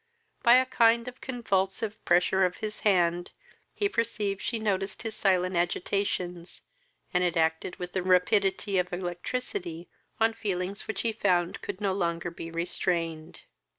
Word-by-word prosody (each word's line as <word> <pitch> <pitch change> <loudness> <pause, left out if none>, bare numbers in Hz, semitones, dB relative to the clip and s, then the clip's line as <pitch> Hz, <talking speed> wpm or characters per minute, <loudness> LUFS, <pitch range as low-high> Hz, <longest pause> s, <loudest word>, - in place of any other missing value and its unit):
By 235 +1 +7
a 255 0 +5
kind 235 -2 +3
of 250 0 -9
convulsive 215 -3 -1
pressure 180 +2 +3
of 180 -1 +1
his 215 0 -5
hand, 175 -3 +2 0.4
he 410 - 0
perceived 210 - -1
she 235 - -1
noticed 200 -2 -2
his 225 -1 -3
silent 185 -2 +2
agitations, 175 0 -2 0.5
and 180 0 +3
it 175 -1 +1
acted 160 +2 +1
with 180 0 -7
the 190 - 0
rapidity 190 +2 +2
of 180 0 -1
electricity 175 0 -4 0.3
on 225 0 +3
feelings 195 -2 -3
which 220 -3 -2
he 230 - 0
found 185 -3 +1
could - - -5
no 200 -2 0
longer 170 -2 -1
be 165 0 -7
restrained. 165 -1 -2
190 Hz, 150 wpm, -28 LUFS, 175-215 Hz, 0.5 s, By